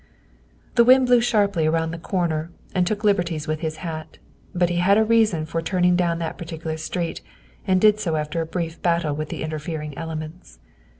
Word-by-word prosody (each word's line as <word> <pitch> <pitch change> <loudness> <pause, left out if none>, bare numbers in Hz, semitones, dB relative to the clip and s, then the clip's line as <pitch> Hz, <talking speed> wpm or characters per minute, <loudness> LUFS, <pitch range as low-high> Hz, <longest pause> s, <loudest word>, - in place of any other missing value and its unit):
' - - -33
' - - -32
The 235 - +8
wind 255 +1 +5
Hew 245 -1 +6
sharply 200 -8 +2
around 160 0 0
the 165 - -6
corner 165 -3 -1 0.2
and 180 -1 +1
took 215 +2 -2
liberties 175 -7 +1
with 155 0 -1
his 160 -1 -3
hat, 160 -1 -6 0.3
but 175 -2 +1
he 175 - -1
had 190 +3 +4
a 220 - +5
reason 220 -8 +2
for 165 +1 -3
turning 180 +1 +2
down 170 -2 +1
that 165 -1 -4
particular 160 -1 -5
street 165 +2 -3 0.5
and 185 -1 +3
did 215 +1 +5
so 170 -6 -1
after 155 +2 -2
a 165 - -4
brief 165 -1 -4
battle 170 -3 +1
with 155 0 -4
the - - -5
interfering 155 -1 -5
elements. 155 - -7
170 Hz, 200 wpm, -23 LUFS, 160-185 Hz, 0.5 s, The